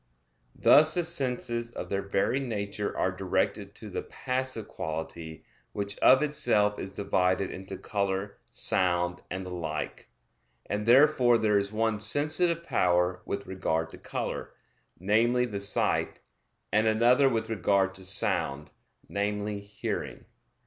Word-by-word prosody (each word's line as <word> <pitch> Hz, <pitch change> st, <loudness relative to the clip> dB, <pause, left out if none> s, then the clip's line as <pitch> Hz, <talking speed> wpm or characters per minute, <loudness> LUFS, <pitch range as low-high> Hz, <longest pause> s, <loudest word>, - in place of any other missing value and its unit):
Thus 155 Hz, +1 st, +6 dB
the 175 Hz, -, +1 dB
senses 125 Hz, -7 st, +1 dB
of -, -, -7 dB
their 100 Hz, 0 st, -1 dB
very 100 Hz, +7 st, 0 dB
nature 105 Hz, -5 st, -4 dB
are -, -, +1 dB
directed -, -, -2 dB
to -, -, -9 dB
the -, -, -3 dB
passive 130 Hz, -4 st, -3 dB
quality 80 Hz, 0 st, -6 dB, 0.3 s
which 100 Hz, 0 st, -3 dB
of 135 Hz, +3 st, +6 dB
itself 110 Hz, -9 st, +1 dB
is 95 Hz, +1 st, -7 dB
divided 95 Hz, -1 st, 0 dB
into 95 Hz, 0 st, -7 dB
color, 100 Hz, 0 st, -3 dB
sound, 90 Hz, -1 st, +2 dB
and 95 Hz, 0 st, -5 dB
the 90 Hz, -, -7 dB
like, 80 Hz, -3 st, -5 dB, 0.6 s
and 105 Hz, +1 st, -3 dB
therefore 125 Hz, -1 st, +5 dB
there 110 Hz, -2 st, +1 dB
is 100 Hz, 0 st, -3 dB
one 110 Hz, -1 st, 0 dB
sensitive 155 Hz, -, +2 dB
power 90 Hz, -, +1 dB
with 100 Hz, 0 st, -4 dB
regard 80 Hz, -3 st, -2 dB
to -, -, -11 dB
color, -, -, -5 dB, 0.5 s
namely, 115 Hz, +6 st, +2 dB
the 100 Hz, -4 st, -5 dB
sight, 100 Hz, -, +1 dB, 0.5 s
and 110 Hz, +1 st, +3 dB
another 120 Hz, +5 st, +4 dB
with 115 Hz, -3 st, -1 dB
regard 100 Hz, -3 st, +1 dB
to 95 Hz, -1 st, -12 dB
sound, 75 Hz, -6 st, -2 dB, 0.4 s
namely, 105 Hz, 0 st, -2 dB
hearing. 100 Hz, +1 st, -5 dB
105 Hz, 135 wpm, -28 LUFS, 95-120 Hz, 0.6 s, Thus